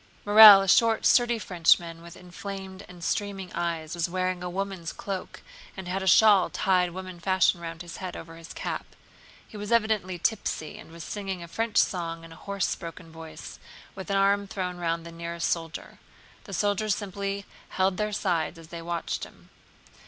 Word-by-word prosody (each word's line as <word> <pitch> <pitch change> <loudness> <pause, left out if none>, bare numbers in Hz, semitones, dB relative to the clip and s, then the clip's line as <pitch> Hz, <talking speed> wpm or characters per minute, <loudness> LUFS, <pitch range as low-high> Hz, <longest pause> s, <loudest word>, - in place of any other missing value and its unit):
Morel, 205 -1 +10
a - - -4
short 225 +4 +4
sturdy 240 -1 +4
Frenchman 170 -4 +2
with 170 0 -12
inflamed 190 +1 -8
and 175 -2 -12
streaming 195 -1 -3
eyes, 165 -2 -3
was 170 -1 -1
wearing 185 0 -1
a 180 - -4
woman's 190 -2 -4
cloak 195 -2 -6 0.3
and 190 -2 -7
had 190 +2 -2
a 190 - -3
shawl 205 0 +6
tied 180 -2 +2
woman 185 0 -8
fashion 185 -1 +2
round 165 0 -6
his 175 - -9
head 185 -1 -6
over 165 0 -10
his 165 0 -11
cap. - - -4 0.6
He 215 - -11
was 205 +2 -6
evidently 215 -5 +1
tipsy, 175 -5 -2
and - - -13
was 165 0 -9
singing 195 -4 -5
a - - -9
French 225 +5 -2
song 165 -3 +1
in 165 - -12
a - - -11
hoarse 200 -2 0
broken 165 0 -10
voice, 160 -1 -10 0.3
with 190 0 -8
an 195 - +1
arm 200 +1 +2
thrown 180 -2 -4
round 165 -1 -2
the 170 - -8
nearest 170 0 -4
soldier. 165 0 -4 0.5
The - - -9
soldiers 205 0 +1
simply 200 0 -4 0.2
held 190 0 +1
their 210 0 -1
sides 175 -6 -1
as 165 -1 -13
they 170 -1 -7
watched 170 0 -3
him. - - -13
185 Hz, 180 wpm, -27 LUFS, 170-200 Hz, 0.6 s, Morel